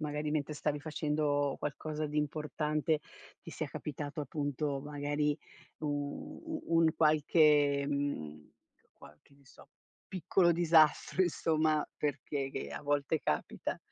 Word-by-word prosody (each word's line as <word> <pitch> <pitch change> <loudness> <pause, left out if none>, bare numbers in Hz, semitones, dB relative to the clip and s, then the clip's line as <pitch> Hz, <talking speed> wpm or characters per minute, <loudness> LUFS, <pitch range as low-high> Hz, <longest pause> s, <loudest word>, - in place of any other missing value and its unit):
magari 150 0 -2
mentre 150 -1 -1
stavi 150 -1 -2
facendo 150 -2 0
qualcosa 155 +1 -3
di 150 +1 -2
importante, 150 +1 0 0.4
ti - - -13
sia - - -3
capitato 150 +1 -5
appunto 145 0 -2
magari 145 0 0 0.4
u 145 -2 -4
u 320 -1 -4
un 165 -1 +5
qualche 150 -2 +4
mhmm, 80 - -3 0.4
qual 75 - -16
che - - -26
ne 140 -1 -25
so, - - -17 0.4
piccolo 180 -1 +2
disastro, 165 +1 +4
insomma, 155 -3 +1
per 145 -2 -1
che 135 -2 -3
che - - -4
a - - -6
volte 145 +2 +1
capita? 75 - -2
150 Hz, 130 wpm, -32 LUFS, 145-155 Hz, 0.4 s, un